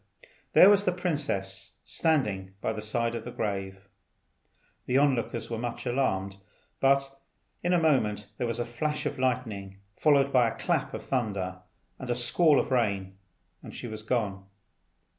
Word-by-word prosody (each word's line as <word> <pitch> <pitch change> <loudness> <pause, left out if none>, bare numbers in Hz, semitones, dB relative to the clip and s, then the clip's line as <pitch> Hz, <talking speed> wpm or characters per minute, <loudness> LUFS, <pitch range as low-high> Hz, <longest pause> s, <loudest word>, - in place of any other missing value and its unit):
there - - +9
was 200 0 +6
the 180 - +2
princess 145 - -3
standing 105 - 0
by 110 - -1
the 110 - -5
side 115 +2 -1
of 115 -2 -4
the 120 - -7
grave. 95 -3 -4 1.0
The 130 - +2
lookers 125 -5 +1
on 115 - -14
were 115 - -3
much 120 +1 -4
alarmed, 100 -7 0 0.4
but 135 0 +2 0.4
in 175 - 0
a 180 - +4
moment 110 -10 +2
there 120 - 0
was 115 0 -2
a 120 - -1
flash 150 +6 -2
of 140 - -3
lightning, 110 -7 -2 0.2
followed 140 -2 +3
by 125 -3 +5
a - - -8
clap - - -1
of - - -7
thunder 100 -8 -2 0.4
and 130 - -7
a 120 - +1
squall 145 +5 +3
of - - -2
rain, 100 -6 0 0.5
and - - -10
she - - -7
was 110 -2 -6
gone. 105 -4 -2
120 Hz, 165 wpm, -28 LUFS, 100-135 Hz, 1.0 s, there